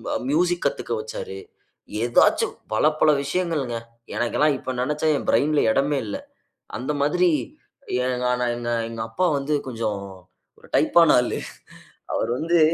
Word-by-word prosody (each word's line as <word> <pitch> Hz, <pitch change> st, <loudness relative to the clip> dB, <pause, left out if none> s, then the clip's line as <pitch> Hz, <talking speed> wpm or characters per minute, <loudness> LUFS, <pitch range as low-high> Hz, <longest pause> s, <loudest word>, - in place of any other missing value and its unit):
அ -, -, +2 dB
music 175 Hz, +3 st, +1 dB
கத்துக்க -, -, -1 dB
வச்சாரு. 470 Hz, -2 st, -6 dB, 0.7 s
ஏதாச்சும் 120 Hz, 0 st, +3 dB, 0.2 s
பல, 110 Hz, -, +2 dB, 0.2 s
பல 155 Hz, -, +6 dB
விஷயங்கள்ங்க. 145 Hz, -6 st, -1 dB, 0.4 s
எனக்கெல்லாம் 145 Hz, +4 st, +2 dB
இப்ப 130 Hz, 0 st, -5 dB
நினச்சா, 150 Hz, +4 st, -1 dB
என் -, -, -6 dB
பிரெயின்‌ல 150 Hz, +1 st, +3 dB
இடமே 140 Hz, +2 st, +1 dB
இல்ல. 100 Hz, -, -4 dB, 0.6 s
அந்த 135 Hz, +4 st, -2 dB
மாதிரி 175 Hz, +4 st, +3 dB, 0.8 s
ஏங்கான 125 Hz, -1 st, 0 dB
எங்க 120 Hz, 0 st, -3 dB, 0.2 s
எங்க 115 Hz, -1 st, -4 dB
அப்பா 180 Hz, +10 st, +1 dB
வந்து 145 Hz, +2 st, -1 dB
கொஞ்சம் 110 Hz, -4 st, -3 dB, 0.6 s
ஒரு -, -, -18 dB
டைப்பான 165 Hz, -3 st, +5 dB
ஆளு. 125 Hz, -, -2 dB, 0.8 s
அவரு -, -, 0 dB
வந்து 170 Hz, +1 st, +2 dB
145 Hz, 130 wpm, -23 LUFS, 125-170 Hz, 0.8 s, பல